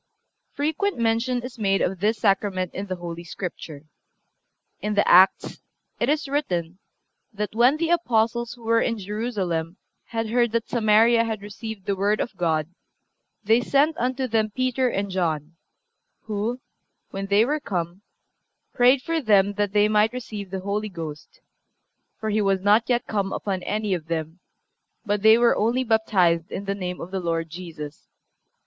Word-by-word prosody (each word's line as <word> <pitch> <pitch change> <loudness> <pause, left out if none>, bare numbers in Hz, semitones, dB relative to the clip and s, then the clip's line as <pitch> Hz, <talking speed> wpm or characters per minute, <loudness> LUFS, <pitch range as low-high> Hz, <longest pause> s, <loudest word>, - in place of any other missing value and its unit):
Frequent 320 +8 -1
mention 235 +2 0
is 250 -1 -8
made 195 -2 +2
of 185 0 -1
this 215 +4 +1
Sacrament 195 -3 0
in 200 +1 -5
the 185 - -3
Holy 170 -1 -7
Scripture. 165 -4 -7 1.0
In 210 0 -2
the 205 - +3
Acts 185 +2 +5 0.4
it 240 - +1
is 300 0 0
written 185 - -2 0.5
that 210 -1 -4
"When 245 +6 +4
the 330 +1 0
Apostles 235 -7 +1
who 240 -1 -16
were 230 0 +3
in 230 - 0
Jerusalem 195 -5 -3 0.3
had 225 -1 -3
heard 240 -1 +2
that 230 -1 0
Samaria 230 0 +4
had 220 -3 -4
received 210 0 -8
the 200 -1 0
Word 205 +2 +1
of 235 - -3
God 160 -4 0 0.8
they 225 +3 +4
sent 285 +5 +2
unto 255 +2 -1
them 220 -2 +1
Peter 255 +2 0
and 200 -3 -2
John, 165 -3 -2 0.7
who, 220 +3 -3 0.5
when 195 0 -4
they 200 +3 +4
were 300 +4 0
come, 180 - -4 0.7
prayed 255 +2 +4
for 330 -1 -1
them 205 -4 +3
that 205 -1 -1
they 210 0 +4
might 215 +2 +2
receive 215 -6 -6
the 190 0 -4
Holy 205 +2 -2
Ghost; 165 - -8 0.8
for 220 -1 -2
He 215 +1 +1
was 195 -2 +1
not 210 +4 +4
yet 240 -1 +1
come 200 -2 -2
upon 190 -3 -3
any 210 +1 -1
of 165 -3 -4
them, 165 +1 -4 0.7
but 205 -1 0
they 220 +2 +7
were 235 0 +4
only 235 +4 +1
baptized 190 -8 +2
in 200 - -5
the 200 - -1
name 180 -2 -5
of 175 - -7
the 190 - -2
Lord 165 -2 -2
Jesus. 160 -4 -9
210 Hz, 165 wpm, -24 LUFS, 185-235 Hz, 1.0 s, they